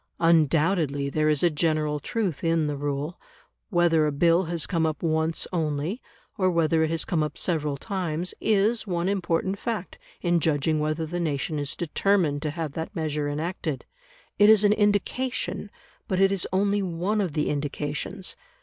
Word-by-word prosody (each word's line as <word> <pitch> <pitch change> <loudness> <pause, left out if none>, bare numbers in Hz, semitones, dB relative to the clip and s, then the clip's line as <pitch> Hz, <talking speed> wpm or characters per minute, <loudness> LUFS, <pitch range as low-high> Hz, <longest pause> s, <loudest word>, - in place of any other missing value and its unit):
Undoubtedly 160 -3 +2
there 155 +2 +2
is 150 0 +2
a 175 - +5
general 155 -1 0
truth 190 - -2
in 165 -1 +2
the 150 -1 -2
rule. 145 +3 -3 0.5
Whether 170 -4 +3
a - - 0
bill 170 +5 +3
has 165 -1 -1
come 165 -4 0
up 155 -1 -1
once 160 0 +1
only, 160 - -1 0.4
or 185 -1 +3
whether 165 -2 +2
it 160 - +2
has 165 0 0
come 165 -3 0
up 150 -1 -3
several 150 -5 0
times, 180 -1 -3
is 215 +2 +2
one 175 -1 -1
important 190 0 0
fact 215 -6 -4 0.2
in 175 -1 +2
judging 155 0 +1
whether 155 +2 -1
the 175 +3 -4
nation 150 -2 -1
is 145 0 -1
determined 170 -3 +1
to 155 - -2
have 160 -1 -4
that 165 +7 -6
measure 150 -3 -1
enacted; 155 -1 -3 0.5
it 205 +1 +7
is 215 -1 +7
an 205 0 +5
indication, 210 +3 0 0.4
but 185 - 0
it 195 0 +5
is 195 -3 0
only 200 +2 +2
one 190 +4 -1
of 180 -6 -2
the 150 -1 0
indications. 145 +6 -3
165 Hz, 170 wpm, -26 LUFS, 150-185 Hz, 0.5 s, it